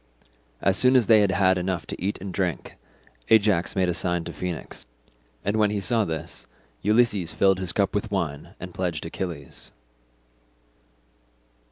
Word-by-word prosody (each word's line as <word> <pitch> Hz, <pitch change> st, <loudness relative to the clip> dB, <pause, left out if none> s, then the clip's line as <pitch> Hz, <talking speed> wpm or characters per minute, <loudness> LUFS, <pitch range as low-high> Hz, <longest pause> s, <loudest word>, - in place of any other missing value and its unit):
As 95 Hz, -1 st, +3 dB
soon 130 Hz, +1 st, +5 dB
as 125 Hz, -3 st, +5 dB
they 110 Hz, 0 st, +6 dB
had 100 Hz, -, +3 dB
had 95 Hz, 0 st, +3 dB
enough 90 Hz, -1 st, -2 dB
to -, -, -7 dB
eat 100 Hz, +2 st, -1 dB
and 95 Hz, 0 st, -6 dB
drink, 90 Hz, -3 st, -2 dB, 0.5 s
Ajax 105 Hz, -5 st, +3 dB
made 95 Hz, -2 st, +2 dB
a 90 Hz, -, +1 dB
sign 90 Hz, -1 st, -1 dB
to 85 Hz, -, -7 dB
Phoenix, 85 Hz, -2 st, -6 dB, 0.6 s
and 100 Hz, +2 st, +1 dB
when 105 Hz, -1 st, +3 dB
he 105 Hz, 0 st, -1 dB
saw 110 Hz, +2 st, +1 dB
this, 80 Hz, 0 st, -6 dB, 0.3 s
Ulysses 105 Hz, -5 st, +2 dB
filled 95 Hz, -1 st, +3 dB
his 95 Hz, -2 st, -3 dB
cup 100 Hz, -2 st, 0 dB
with 105 Hz, +2 st, -1 dB
wine 85 Hz, -8 st, -3 dB
and 90 Hz, -1 st, -8 dB
pledged 85 Hz, -5 st, -3 dB
Achilles. 80 Hz, -4 st, -6 dB
95 Hz, 160 wpm, -25 LUFS, 85-105 Hz, 0.6 s, they